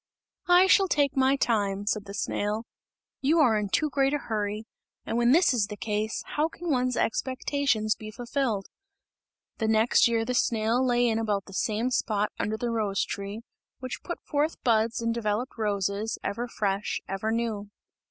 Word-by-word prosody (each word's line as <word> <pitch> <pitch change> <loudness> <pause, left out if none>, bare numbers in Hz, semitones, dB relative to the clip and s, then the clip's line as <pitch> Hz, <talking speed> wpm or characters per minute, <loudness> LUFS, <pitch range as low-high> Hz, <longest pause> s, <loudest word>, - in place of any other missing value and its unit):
"I 355 +1 +7
shall 385 0 +5
take 285 -4 +1
my 265 0 +4
time," 205 -6 0
said 210 -1 -1
the 200 0 -8
snail, 210 +3 -2 0.6
"you 300 +5 +3
are 245 -8 +5
in 210 -1 -1
too 305 - +2
great 275 +1 +2
a - - +2
hurry, 215 -4 -3 0.4
and - - -3
when 240 +1 +3
this 335 0 +5
is 220 -5 +1
the 210 0 -7
case, 215 +1 -2
how 300 +1 0
can 335 0 -5
one's 255 -2 +1
expectations 255 -2 0
be 215 - -9
fulfilled?" 235 -2 -2 0.9
The 220 - 0
next 220 +3 +4
year 230 -1 +1
the 250 - -2
snail 230 +1 +1
lay 245 -1 +3
in 225 -1 +1
about 205 -3 -1
the 195 - -13
same 220 +6 0
spot 210 -3 0
under 215 +1 -1
the 240 0 -2
rose 210 -4 0
tree, 200 +2 -5 0.4
which 255 0 -6
put 345 - -5
forth 300 +2 -1
buds 230 -1 +2
and 230 0 0
developed 230 +2 -2
roses, 205 0 -1
ever 240 +4 -2
fresh, 200 -3 -1
ever 195 +3 -2
new. 225 -3 -2
225 Hz, 175 wpm, -27 LUFS, 210-255 Hz, 0.9 s, I